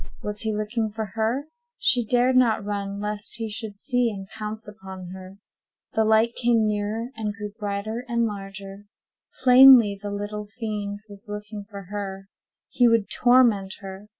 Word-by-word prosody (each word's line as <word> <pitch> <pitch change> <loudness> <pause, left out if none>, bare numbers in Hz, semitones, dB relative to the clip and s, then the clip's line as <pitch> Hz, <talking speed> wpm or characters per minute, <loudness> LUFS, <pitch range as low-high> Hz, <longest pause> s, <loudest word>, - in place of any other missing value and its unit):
Was 210 0 -4
he 220 - -1
looking 215 +1 -1
for 220 +1 -4
her? 230 +5 0 0.3
She 245 -2 +3
dared 245 +3 +2
not 230 -5 +3
run, 200 -1 -3
lest 210 0 -3
he 225 -1 -4
should 215 -1 -5
see 245 +2 0
and 195 -3 -7
pounce 215 0 -6
upon 190 -3 -9
her. 190 +1 -10 0.6
The 220 - +3
light 220 +2 +4
came 235 -2 +2
nearer, 210 +3 -2
and 215 -2 -3
grew 210 -2 -6
brighter 210 +3 -3
and 235 -1 +1
larger. 195 -1 -7 0.6
Plainly, 250 -5 +8
the 205 - -4
little 205 +1 -5
fiend 205 -3 -4
was 205 +1 -12
looking 210 0 -6
for 200 -2 -8
her—he 200 +4 -3
would 230 -3 +2
torment 235 -6 +4
her. 195 +1 -9
210 Hz, 155 wpm, -24 LUFS, 200-230 Hz, 0.6 s, Plainly